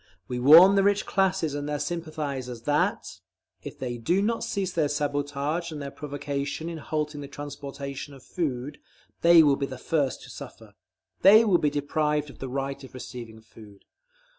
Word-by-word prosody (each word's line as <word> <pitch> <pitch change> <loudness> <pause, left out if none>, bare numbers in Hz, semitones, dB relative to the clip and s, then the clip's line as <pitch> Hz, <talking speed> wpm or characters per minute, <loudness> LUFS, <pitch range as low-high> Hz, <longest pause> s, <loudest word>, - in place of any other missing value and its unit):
We 125 - -3
warn 165 +9 +9
the 200 - +4
rich 200 +1 +2
classes 190 -5 +1
and 145 0 -4
their 150 - -1
sympathisers 145 -6 -4
that, 145 +2 0 0.4
if - - -9
they 120 -2 -4
do 175 - +1
not 230 +2 0
cease 190 -2 -2
their 160 -4 +1
sabotage 145 +3 -2
and 155 - -6
their 140 -1 -6
provocation 145 +2 -4
in 165 -1 -6
halting 150 -1 -3
the 140 - -7
transportation 140 -1 -7
of 135 - -15
food, 140 -5 -4 0.4
they 170 -1 +8
will 140 -2 +3
be 140 - -2
the 130 - -8
first 140 0 -1
to - - -11
suffer. - - -11 0.5
They 215 +4 +8
will 185 -5 +4
be 150 - +2
deprived 150 0 -1
of - - -18
the 135 - -5
right 135 +1 -4
of 130 - -12
receiving 120 -3 -9
food. 105 -3 -16
145 Hz, 175 wpm, -26 LUFS, 135-160 Hz, 0.5 s, warn